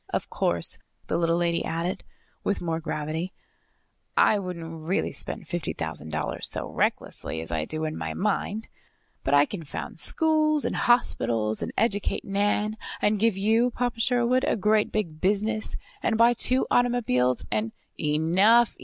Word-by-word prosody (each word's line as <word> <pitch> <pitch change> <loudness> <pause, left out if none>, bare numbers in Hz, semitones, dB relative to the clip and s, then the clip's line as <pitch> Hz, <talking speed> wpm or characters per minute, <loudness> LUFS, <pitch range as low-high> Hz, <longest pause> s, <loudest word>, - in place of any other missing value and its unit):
"Of - - -3
course," 85 -1 +1 0.3
the - - -2
little 165 0 +2
lady 170 -1 +1
added, 170 +3 -2 0.4
with 200 - 0
more 165 -2 -2
gravity, 160 +3 -3 0.8
"I 210 - +5
wouldn't 165 -4 -6
really 185 - 0
spend - - -4
fifty 175 -1 -3
thousand 80 -1 -5
dollars 80 -1 -2
so - - -3
recklessly 80 - -1
as 80 0 -6
I 80 -1 -1
do 155 - -3
in 155 0 -3
my - - -4
mind. 210 +2 -1 0.6
But 140 - +2
I 145 0 +6
can 170 +1 -6
found 145 - -6
schools, 310 -2 +2
and - - -1
hospitals, 115 - +2
and - - -3
educate 205 -2 0
Nan, 205 +2 0 0.2
and 210 0 +2
give 220 -2 +2
you, 225 +5 +3
Papa 245 -1 -2
Sherwood, 245 +2 +2
a - - +2
great 210 0 +2
big 170 -8 -3
business, 215 +3 0 0.3
and 220 - +1
buy 235 +1 +6
two 255 +2 +2
automobiles, 215 - +2
and 110 +1 -1 0.2
" - - -50
"Enough! 180 +10 +4
190 Hz, 160 wpm, -26 LUFS, 155-225 Hz, 0.8 s, I